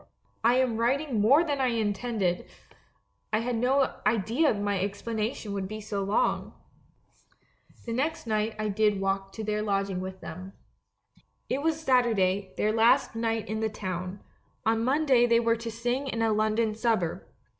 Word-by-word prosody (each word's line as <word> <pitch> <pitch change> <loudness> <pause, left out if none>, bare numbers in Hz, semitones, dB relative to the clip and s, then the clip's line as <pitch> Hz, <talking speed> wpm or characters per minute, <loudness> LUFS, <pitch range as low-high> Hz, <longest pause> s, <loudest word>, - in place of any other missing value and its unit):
"I 235 +2 +5
am 255 -3 +1
writing 250 0 +1
more 275 +10 +6
than 290 -4 -1
I 260 - +3
intended; 215 -4 -1 0.8
I 215 - +1
had 245 +1 -1
no 260 +3 +1
idea 230 - +2
that 210 - -3
my 205 -1 0
explanation 210 +2 -3
would 195 -1 -3
be 215 +2 -6
so 205 -2 -3
long! 200 +2 0 1.3
"The 230 - -3
next 295 +5 -1
night 215 0 -1
I 215 0 -2
did 210 0 +2
walk 195 0 -1
to 220 - -6
their 210 0 -1
lodging 195 -3 -1
with 190 0 -6
them. 185 +1 -8 1.0
It 265 +2 0
was 320 +1 0
Saturday, 205 -9 +1
their 215 - +2
last 225 +2 +4
night 225 -1 -1
in 220 +2 -3
the 220 0 0
town; 185 -2 -5 0.4
on 225 0 +2
Monday 260 -2 +3
they 235 0 +4
were 230 -1 +2
to 230 +1 -5
sing 240 +4 -2
in 230 -3 -1
a 220 -1 +2
London 215 +1 +1
suburb. 220 -7 0
220 Hz, 165 wpm, -28 LUFS, 200-240 Hz, 1.3 s, more